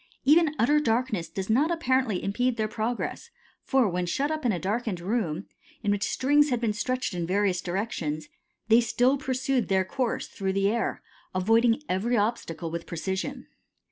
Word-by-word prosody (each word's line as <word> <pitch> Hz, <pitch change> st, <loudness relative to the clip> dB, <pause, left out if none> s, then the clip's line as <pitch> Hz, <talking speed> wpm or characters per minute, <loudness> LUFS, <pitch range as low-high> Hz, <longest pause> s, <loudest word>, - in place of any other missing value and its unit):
Even 310 Hz, +1 st, +5 dB
utter 295 Hz, +6 st, +4 dB
darkness 230 Hz, -, 0 dB
does 195 Hz, -1 st, -4 dB
not 265 Hz, +9 st, +3 dB
apparently 260 Hz, -, +1 dB
impede 245 Hz, +5 st, 0 dB
their 215 Hz, -1 st, 0 dB
progress, 220 Hz, +2 st, -3 dB, 0.3 s
for 265 Hz, -4 st, +2 dB
when 180 Hz, -1 st, -1 dB
shut 280 Hz, -, 0 dB
up 310 Hz, -1 st, -3 dB
in -, -, +3 dB
a 185 Hz, -, -1 dB
darkened 205 Hz, +1 st, -2 dB
room, 185 Hz, -3 st, -2 dB, 0.4 s
in 205 Hz, -, +2 dB
which 205 Hz, 0 st, 0 dB
strings 290 Hz, +3 st, +3 dB
had 245 Hz, -3 st, 0 dB
been 230 Hz, -3 st, 0 dB
stretched 255 Hz, +1 st, -2 dB
in 170 Hz, -2 st, -2 dB
various 190 Hz, -1 st, +1 dB
directions, 175 Hz, -6 st, -3 dB, 0.4 s
they 225 Hz, +2 st, +6 dB
still 245 Hz, +3 st, +2 dB
pursued 260 Hz, -1 st, -1 dB
their 190 Hz, -1 st, +2 dB
course 250 Hz, +4 st, -2 dB
through 190 Hz, -2 st, -3 dB
the 195 Hz, +1 st, +2 dB
air, 230 Hz, +1 st, -2 dB, 0.3 s
avoiding 225 Hz, +7 st, +3 dB
every 225 Hz, +6 st, 0 dB
obstacle 180 Hz, -7 st, -2 dB
with 170 Hz, 0 st, -5 dB
precision. 190 Hz, -, -3 dB
225 Hz, 170 wpm, -27 LUFS, 190-255 Hz, 0.4 s, they